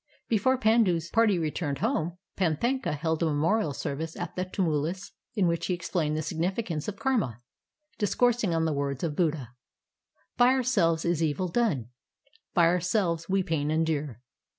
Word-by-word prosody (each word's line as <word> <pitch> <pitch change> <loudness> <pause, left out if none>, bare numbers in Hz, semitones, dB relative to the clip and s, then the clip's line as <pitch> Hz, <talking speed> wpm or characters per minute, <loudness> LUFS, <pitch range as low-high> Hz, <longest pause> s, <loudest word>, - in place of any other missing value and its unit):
Before 235 +4 +2
Pandu's 215 -8 +2
party 225 -4 +4
returned 155 -3 -2
home, 175 - -1 0.2
Panthaka 195 - 0
held 160 +2 -1
a 165 - +3
memorial 160 +4 +1
service 145 +3 -4
at 175 -2 -5
the 185 - -1
tumulus 175 0 -2 0.2
in 200 -4 +2
which 170 -1 0
he 180 - +1
explained 165 -3 -1
the 155 - -2
significance 165 +1 -2
of 205 -1 -4
karma, 205 - -1 0.6
discoursing 230 -1 +2
on 165 0 +1
the 160 - 0
words 140 0 -2
of 155 -3 -1
Buddha: 150 -8 0 0.4
— - - -44
"By 245 +1 +6
ourselves 200 -11 +2
is 170 -2 +1
evil 160 +3 0
done, 165 - 0 0.7
By 170 -3 +6
ourselves 175 -1 +1
we 190 0 +2
pain 150 -4 -1
endure. 155 -6 -1
170 Hz, 155 wpm, -28 LUFS, 155-205 Hz, 0.7 s, By